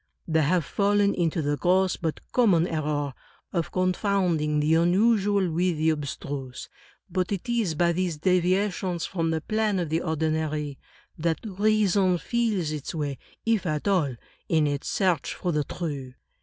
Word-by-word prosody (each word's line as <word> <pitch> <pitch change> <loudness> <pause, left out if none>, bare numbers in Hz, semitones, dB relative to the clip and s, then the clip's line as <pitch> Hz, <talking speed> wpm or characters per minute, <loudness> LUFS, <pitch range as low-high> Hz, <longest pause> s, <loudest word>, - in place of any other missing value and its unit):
They 160 -1 +2
have 165 +2 +2
fallen 200 +2 +2
into 165 -2 0
the 145 0 0
gross 185 +4 +2
but 160 -2 -3
common 195 -9 +4
error 150 -4 -2 0.4
of 170 -3 -1
con 185 0 +1
founding 175 -7 +1
the 150 +2 +2
unusual 195 +2 +3
with 175 0 +1
the 160 +1 +3
abstruse. 140 -3 -5 0.4
But 185 +1 -1
it 200 +4 -3
is 230 -9 0
by 170 +2 +3
these 175 -2 -1
deviations 185 +1 +1
from 165 -3 -1
the 160 -1 -1
plane 215 +3 0
of 175 -4 -1
the 160 +2 0
ordinary 155 -3 -1 0.4
that 160 0 +1
reason 200 -2 +2
feels 200 -2 -1
its 150 +1 -5
way, 145 -4 -3 0.3
if 225 -5 +1
at 155 +3 -2
all, 165 -10 +2 0.3
in 160 -2 +3
its 145 -1 -2
search 185 -6 0
for 180 - -2
the 150 -2 0
true. 140 -7 -5
170 Hz, 155 wpm, -26 LUFS, 155-190 Hz, 0.4 s, common